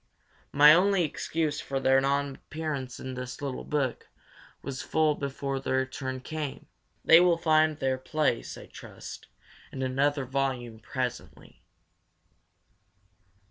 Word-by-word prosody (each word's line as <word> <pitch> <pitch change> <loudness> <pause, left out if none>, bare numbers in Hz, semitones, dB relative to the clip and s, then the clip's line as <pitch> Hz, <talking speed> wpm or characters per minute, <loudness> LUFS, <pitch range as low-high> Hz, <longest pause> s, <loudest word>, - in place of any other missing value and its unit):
My 150 +2 +8
only 190 +2 +4
excuse 155 -1 -2
for 135 0 -3
their 135 0 +4
non 140 +1 0
appearance 140 -5 -5
is 130 - -6
that 125 0 -6
my 145 - -4
little 130 -2 -4
book 140 -5 -2 0.5
was 135 -1 -5
full 155 -1 +2
before 140 -1 -3
their 130 0 0
turn 130 -1 -5
came. 150 0 -5 0.4
They 165 - +9
will 175 -1 +4
find 155 -2 +3
their 130 -2 -1
place, 150 -2 -1
I - - -10
trust, - - -10 0.4
in 130 - -4
another 140 +2 +1
volume 125 -4 -2
presently. 125 +3 -5
140 Hz, 130 wpm, -28 LUFS, 130-155 Hz, 0.5 s, They